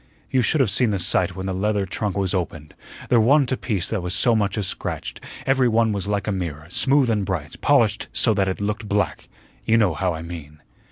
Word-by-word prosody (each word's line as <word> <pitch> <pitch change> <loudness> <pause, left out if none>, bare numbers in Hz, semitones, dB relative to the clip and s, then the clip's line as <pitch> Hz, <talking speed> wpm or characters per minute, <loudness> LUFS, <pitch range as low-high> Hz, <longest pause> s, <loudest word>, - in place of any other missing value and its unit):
"You 130 - +3
should 145 +4 +2
have 115 -7 +2
seen 120 +3 +2
the 100 - 0
sight 90 0 +1
when 95 0 -5
the 95 - -2
leather 100 +1 0
trunk 100 +1 -3
was 95 -1 0
opened. 80 -5 -4 0.4
There 120 - +5
wa'n't 135 +4 +3
a - - +2
piece 105 -8 -1
that 110 -4 -1
was 90 +1 -3
so 120 -3 +3
much 105 -1 0
as 105 - 0
scratched; - - -4 0.2
every 135 -1 +3
one 115 -1 +2
was 100 -1 -3
like 100 -2 -1
a 105 - -1
mirror, 85 -6 -4
smooth 135 0 +2
and 105 -2 0
bright, 90 -6 -4
polished - - +2
so 110 - +2
that 100 -2 +1
it 95 - -2
looked 105 +1 -3
black 105 0 -1 0.3
you 115 - +3
know 105 -7 +3
how 90 0 -1
I 80 - -7
mean." 80 -3 -9
100 Hz, 230 wpm, -22 LUFS, 90-115 Hz, 0.4 s, There